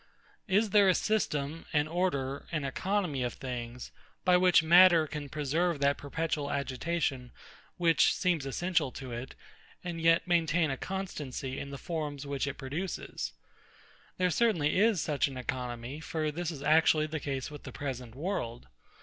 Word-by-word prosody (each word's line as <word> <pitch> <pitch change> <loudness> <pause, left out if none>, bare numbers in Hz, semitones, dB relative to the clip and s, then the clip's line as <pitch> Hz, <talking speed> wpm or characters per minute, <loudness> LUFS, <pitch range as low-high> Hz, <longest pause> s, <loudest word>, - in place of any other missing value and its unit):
Is 205 +2 +2
there 200 -1 +6
a 185 - +4
system, 160 -8 -1
an 150 0 +2
order, 150 -6 -1
an 155 -3 -1
economy 180 0 -1
of 125 -1 -2
things, 125 -1 -6 0.3
by 180 -1 +6
which 180 -2 +5
matter 170 0 +7
can 150 -1 -6
preserve 155 +3 0
that 140 0 +2
perpetual 150 0 -2
agitation 140 -2 -2 0.5
which 165 -2 +4
seems 170 -7 0
essential 165 0 0
to 130 -2 -7
it, 120 +3 -6 0.5
and 170 -2 -4
yet 165 +1 +4
maintain 165 -2 +2
a - - -1
constancy 145 -7 -5
in 140 - -6
the 140 - -6
forms 150 -3 -4
which 140 0 -2
it 140 - -3
produces? 150 +8 -4 0.8
There 180 -1 +2
certainly 180 -7 +2
is 215 -2 +4
such 145 -1 +1
an 135 -2 -7
economy; 125 +1 -4
for 155 -1 -2
this 170 +2 -3
is 150 -4 -6
actually 155 +1 +4
the 155 0 -4
case 135 -1 -4
with 150 - -9
the - - -9
present 125 -4 -5
world. 130 - -3
150 Hz, 160 wpm, -30 LUFS, 135-175 Hz, 0.8 s, matter